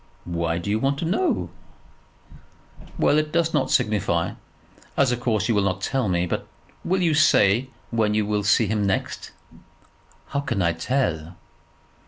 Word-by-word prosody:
"Why 85 Hz, -1 st, -1 dB
do 95 Hz, +4 st, -3 dB
you 110 Hz, -, +1 dB
want 135 Hz, +3 st, 0 dB
to 165 Hz, -, -3 dB
know?" 275 Hz, -, 0 dB, 1.5 s
"Well, 150 Hz, -, +3 dB
it 155 Hz, 0 st, -2 dB
does 165 Hz, 0 st, +1 dB
not -, -, +1 dB
signify, 105 Hz, -8 st, +1 dB, 0.7 s
as 135 Hz, -3 st, +3 dB
of 120 Hz, -, -1 dB
course 110 Hz, -3 st, 0 dB
you 115 Hz, -, +2 dB
will 105 Hz, -, +2 dB
not 95 Hz, -1 st, -1 dB
tell 130 Hz, -1 st, 0 dB
me. 90 Hz, -1 st, +1 dB
But 85 Hz, -, -3 dB, 0.4 s
will 185 Hz, +1 st, 0 dB
you 165 Hz, -2 st, +3 dB
say 125 Hz, -6 st, +4 dB, 0.2 s
when 110 Hz, -2 st, +1 dB
you 105 Hz, -1 st, +1 dB
will 105 Hz, 0 st, -1 dB
see 105 Hz, +3 st, +4 dB
him 105 Hz, 0 st, 0 dB
next?" 95 Hz, -1 st, -2 dB, 1.0 s
"How 140 Hz, -, -1 dB
can 140 Hz, -7 st, -2 dB
I 85 Hz, 0 st, +2 dB
tell?" 85 Hz, -, -2 dB
110 Hz, 165 wpm, -23 LUFS, 95-140 Hz, 1.5 s, say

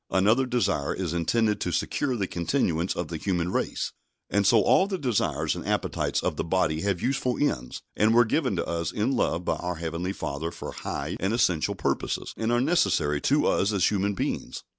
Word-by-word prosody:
Another 110 Hz, +8 st, +3 dB
desire 120 Hz, -, 0 dB
is 90 Hz, -4 st, -3 dB
intended 105 Hz, +5 st, +1 dB
to 90 Hz, -, -1 dB
secure 125 Hz, -, -1 dB
the 100 Hz, -, 0 dB
continuance 85 Hz, -, 0 dB
of 85 Hz, -3 st, -3 dB
the 85 Hz, -, -4 dB
human 90 Hz, 0 st, -1 dB
race. -, -, -1 dB, 0.4 s
And 100 Hz, -1 st, +2 dB
so 110 Hz, -2 st, +5 dB
all 190 Hz, -, +4 dB
the 195 Hz, -2 st, -2 dB
desires 80 Hz, -, 0 dB
and -, -, -6 dB
appetites -, -, -1 dB
of -, -, -1 dB
the -, -, -1 dB
body 85 Hz, -3 st, 0 dB
have 100 Hz, -3 st, -1 dB
useful 130 Hz, -1 st, 0 dB
ends, 65 Hz, -, -1 dB
and 110 Hz, +1 st, +3 dB
were 120 Hz, 0 st, +6 dB
given 130 Hz, -1 st, 0 dB
to 85 Hz, -, -1 dB
us 85 Hz, -1 st, -2 dB
in 110 Hz, +5 st, 0 dB
love 90 Hz, -9 st, 0 dB
by -, -, 0 dB
our 90 Hz, 0 st, -3 dB
Heavenly 85 Hz, +3 st, -3 dB
Father 80 Hz, -2 st, -4 dB
for -, -, -7 dB
high -, -, -4 dB
and 95 Hz, +4 st, 0 dB
essential 90 Hz, -9 st, +1 dB
purposes, -, -, -2 dB
and 110 Hz, +1 st, -1 dB
are 120 Hz, -, +3 dB
necessary 95 Hz, -, +2 dB
to -, -, +2 dB
us 100 Hz, -, +2 dB
as 100 Hz, -2 st, +2 dB
human 100 Hz, 0 st, 0 dB
beings. -, -, -3 dB
95 Hz, 200 wpm, -26 LUFS, 85-115 Hz, 0.4 s, were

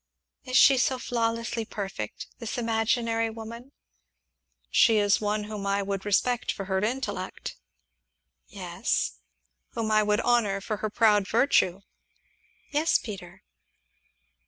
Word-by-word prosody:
"Is 255 Hz, 0 st, +1 dB
she 270 Hz, -2 st, +7 dB
so 260 Hz, +1 st, +2 dB
flawlessly 230 Hz, -1 st, -1 dB
perfect 195 Hz, -, -6 dB
this 230 Hz, -1 st, -5 dB
imaginary 230 Hz, 0 st, 0 dB
woman?" 230 Hz, +3 st, -9 dB, 1.0 s
"She 225 Hz, -3 st, +5 dB
is 205 Hz, 0 st, +3 dB
one 210 Hz, 0 st, 0 dB
whom 210 Hz, -1 st, -5 dB
I 200 Hz, 0 st, +1 dB
would 195 Hz, 0 st, -3 dB
respect 240 Hz, +4 st, +1 dB
for 195 Hz, -, -6 dB
her 190 Hz, 0 st, 0 dB
intellect." 210 Hz, -4 st, -3 dB, 0.9 s
"Yes." 65 Hz, +1 st, -2 dB, 0.5 s
"Whom 220 Hz, -1 st, -2 dB
I 215 Hz, 0 st, +5 dB
would 210 Hz, +1 st, +1 dB
honor 225 Hz, -5 st, +2 dB
for 210 Hz, +2 st, -4 dB
her 215 Hz, +1 st, -3 dB
proud 210 Hz, -2 st, +3 dB
virtue." 210 Hz, -6 st, +2 dB, 0.9 s
"Yes, 310 Hz, +2 st, +3 dB
Peter." 190 Hz, -3 st, -9 dB
215 Hz, 120 wpm, -27 LUFS, 200-235 Hz, 1.0 s, she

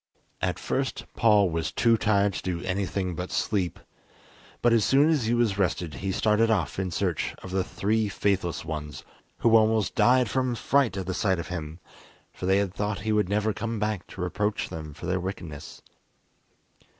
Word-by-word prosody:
At -, -, 0 dB
first -, -, -2 dB
Paul 105 Hz, -5 st, +4 dB
was 80 Hz, 0 st, -2 dB
too 115 Hz, -1 st, +3 dB
tired 100 Hz, -2 st, +2 dB
to -, -, -4 dB
do 90 Hz, -2 st, -3 dB
anything 95 Hz, -1 st, -2 dB
but 90 Hz, +2 st, -5 dB
sleep, 95 Hz, -5 st, -1 dB, 0.9 s
but 120 Hz, -1 st, +5 dB
as 115 Hz, -2 st, +4 dB
soon 145 Hz, +7 st, +4 dB
as 140 Hz, -8 st, +1 dB
he 120 Hz, -, +2 dB
was 110 Hz, -5 st, +1 dB
rested 85 Hz, -4 st, 0 dB
he 95 Hz, +8 st, -3 dB
started 110 Hz, +3 st, +2 dB
off 95 Hz, -5 st, 0 dB
in 95 Hz, -1 st, -1 dB
search 90 Hz, -2 st, -1 dB
of 95 Hz, -, -8 dB
the 95 Hz, 0 st, +1 dB
three 105 Hz, +3 st, 0 dB
faithless 95 Hz, -3 st, -1 dB
ones, 75 Hz, -1 st, -5 dB, 0.4 s
who 115 Hz, -1 st, +5 dB
almost 110 Hz, -1 st, +3 dB
died 125 Hz, 0 st, +4 dB
from 130 Hz, +2 st, 0 dB
fright 125 Hz, -5 st, +1 dB
at 95 Hz, -, -3 dB
the 95 Hz, -, -2 dB
sight 95 Hz, -1 st, +1 dB
of 85 Hz, -2 st, -5 dB
him, 80 Hz, -2 st, -5 dB, 0.5 s
for 90 Hz, -, -5 dB
they 95 Hz, +1 st, +4 dB
had 100 Hz, -2 st, 0 dB
thought 105 Hz, 0 st, -2 dB
he 110 Hz, +1 st, -1 dB
would 105 Hz, -3 st, +2 dB
never 105 Hz, +1 st, +1 dB
come 115 Hz, +2 st, -3 dB
back 105 Hz, -3 st, -2 dB
to 95 Hz, -, -9 dB
reproach 105 Hz, +4 st, -1 dB
them 75 Hz, -2 st, -7 dB
for 75 Hz, -, -8 dB
their 90 Hz, +1 st, 0 dB
wickedness. 85 Hz, -4 st, -7 dB
100 Hz, 185 wpm, -26 LUFS, 90-110 Hz, 0.9 s, but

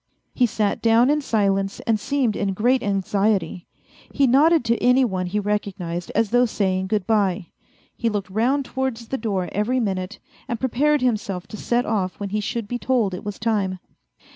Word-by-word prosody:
He 245 Hz, -, +3 dB
sat 210 Hz, -2 st, -1 dB
down 230 Hz, +4 st, +4 dB
in 300 Hz, 0 st, +1 dB
silence 195 Hz, -5 st, 0 dB
and 225 Hz, -2 st, 0 dB
seemed 260 Hz, -3 st, 0 dB
in 195 Hz, -1 st, -1 dB
great 245 Hz, +5 st, +2 dB
anxiety. 195 Hz, -3 st, 0 dB, 0.4 s
He 280 Hz, -, +2 dB
nodded 290 Hz, +3 st, +4 dB
to 235 Hz, 0 st, +1 dB
any 250 Hz, +1 st, +5 dB
one 185 Hz, -5 st, -2 dB
he 205 Hz, +4 st, -1 dB
recognized 195 Hz, -4 st, -3 dB
as 220 Hz, -2 st, +1 dB
though 245 Hz, +1 st, +4 dB
saying 190 Hz, -3 st, -1 dB
good 205 Hz, -1 st, -1 dB
bye. 200 Hz, -5 st, +1 dB, 0.5 s
He 230 Hz, -, 0 dB
looked 200 Hz, -3 st, -4 dB
round 255 Hz, +7 st, +1 dB
towards 255 Hz, -4 st, -3 dB
the 265 Hz, -, -2 dB
door 195 Hz, -5 st, -1 dB
every 230 Hz, +6 st, 0 dB
minute, 190 Hz, -2 st, -2 dB, 0.3 s
and 235 Hz, -, -3 dB
prepared 285 Hz, +3 st, +1 dB
himself 205 Hz, -7 st, -1 dB
to -, -, -7 dB
set 240 Hz, +3 st, 0 dB
off 195 Hz, -4 st, -2 dB
when 200 Hz, -1 st, -4 dB
he 210 Hz, +2 st, -1 dB
should 210 Hz, +1 st, -3 dB
be 245 Hz, +3 st, -3 dB
told 235 Hz, -7 st, +1 dB
it 180 Hz, -, -6 dB
was 205 Hz, -1 st, -5 dB
time. 205 Hz, -4 st, -1 dB
215 Hz, 185 wpm, -22 LUFS, 195-245 Hz, 0.5 s, any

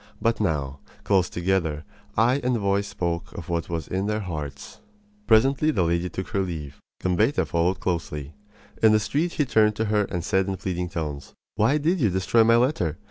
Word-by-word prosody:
But 115 Hz, 0 st, +1 dB
now, 70 Hz, -8 st, -1 dB, 0.2 s
close 95 Hz, -3 st, +2 dB
together, 85 Hz, -4 st, -1 dB, 0.3 s
eye 125 Hz, +6 st, +3 dB
and 125 Hz, -1 st, +1 dB
voice 100 Hz, -1 st, 0 dB
spoke 85 Hz, -1 st, -3 dB
of 85 Hz, -, -8 dB
what 85 Hz, 0 st, -2 dB
was 85 Hz, -2 st, -3 dB
in 95 Hz, +2 st, -2 dB
their 105 Hz, 0 st, -1 dB
hearts. 75 Hz, -7 st, -7 dB, 0.5 s
Presently 135 Hz, +7 st, +4 dB
the 100 Hz, -, +2 dB
lady 85 Hz, +2 st, 0 dB
took 95 Hz, +2 st, -6 dB
her 100 Hz, -2 st, 0 dB
leave. 80 Hz, -7 st, -5 dB, 0.2 s
Gambetta 105 Hz, +10 st, +2 dB
followed 85 Hz, +3 st, 0 dB
closely. 75 Hz, -5 st, -3 dB, 0.5 s
In 110 Hz, -1 st, +6 dB
the 110 Hz, -, +5 dB
street 155 Hz, +10 st, -1 dB
he 150 Hz, -, +1 dB
turned 110 Hz, -3 st, +3 dB
to 110 Hz, -, -1 dB
her 105 Hz, -1 st, +3 dB
and 90 Hz, -3 st, -4 dB
said 95 Hz, 0 st, +1 dB
in 95 Hz, -1 st, -2 dB
pleading 90 Hz, -2 st, -3 dB
tones: 75 Hz, -5 st, -5 dB, 0.2 s
"Why 110 Hz, +8 st, +2 dB
did 165 Hz, +5 st, +1 dB
you 115 Hz, -7 st, +3 dB
destroy 95 Hz, +5 st, +3 dB
my 115 Hz, +1 st, +5 dB
letter? 115 Hz, -, +1 dB
95 Hz, 190 wpm, -25 LUFS, 85-110 Hz, 0.5 s, In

